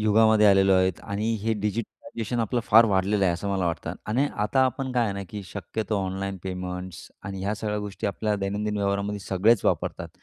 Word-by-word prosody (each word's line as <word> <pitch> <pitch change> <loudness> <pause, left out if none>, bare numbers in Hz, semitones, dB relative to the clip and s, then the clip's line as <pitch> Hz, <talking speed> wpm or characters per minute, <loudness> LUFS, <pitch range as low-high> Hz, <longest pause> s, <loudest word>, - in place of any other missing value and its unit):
युगामध्ये 110 0 +5
आलेलो 95 -1 +5
आहेत 95 -1 +2
आणि 105 +3 -2
हे 110 +1 +1
डिजिटलायझेशन 110 +2 -3
आपलं 120 +2 0
फार 115 +3 +7
वाढलेलं 100 0 +2
आहे, 90 - +3
असं 100 +4 -4
मला 95 -3 0
वाटतं 85 - -3
आणि 125 +7 +1 0.2
आता 130 +5 +3
आपण 130 +1 -3
काय 120 -2 +2
आहे 105 - -1
ना, 100 - -4
की 105 -1 -6
शक्यतो 105 +3 -3
ऑनलाईन 95 +1 -3
पेमेंट्स 90 -1 -6 0.2
आणि 95 -1 -5
ह्या 100 +2 -1
सगळ्या 105 -1 -3
गोष्टी 105 -1 -4
आपल्या 105 +2 -1
दैनंदिन 105 +2 -2
व्यवहारामध्ये 100 +1 -1
सगळेच 100 +4 +2
वापरतात. - - -1
105 Hz, 190 wpm, -26 LUFS, 95-110 Hz, 0.2 s, फार